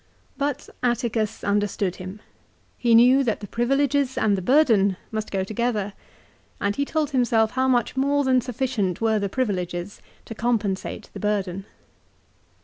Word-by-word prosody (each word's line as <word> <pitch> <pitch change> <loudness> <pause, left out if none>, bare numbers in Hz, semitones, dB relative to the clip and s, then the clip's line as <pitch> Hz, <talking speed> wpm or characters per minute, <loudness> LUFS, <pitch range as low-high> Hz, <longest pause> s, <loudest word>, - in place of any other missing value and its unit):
But 285 -1 -2
Atticus 235 -3 -1
understood 200 -2 0
him. 185 +3 -8 0.5
He 235 -2 +3
knew 250 +4 +6
that 225 -4 -1
the 205 - -7
privileges 275 +3 +1
and 205 -2 +2
the 190 - -3
burden 210 - +3
must 215 -1 -3
go 195 -1 -1
together, 215 -1 -2 0.7
and 200 0 0
told 310 -2 -1
himself 230 -4 +2
how 260 0 +1
much 245 -1 +1
more 280 +2 +2
than 260 -1 +3
sufficient 240 -7 -2
were 220 -1 +2
the 200 -1 -2
privileges 185 -5 -3 0.2
to - - -7
compensate 220 -4 -2
the - - -7
burden. 195 -2 -2
225 Hz, 140 wpm, -24 LUFS, 200-255 Hz, 0.7 s, knew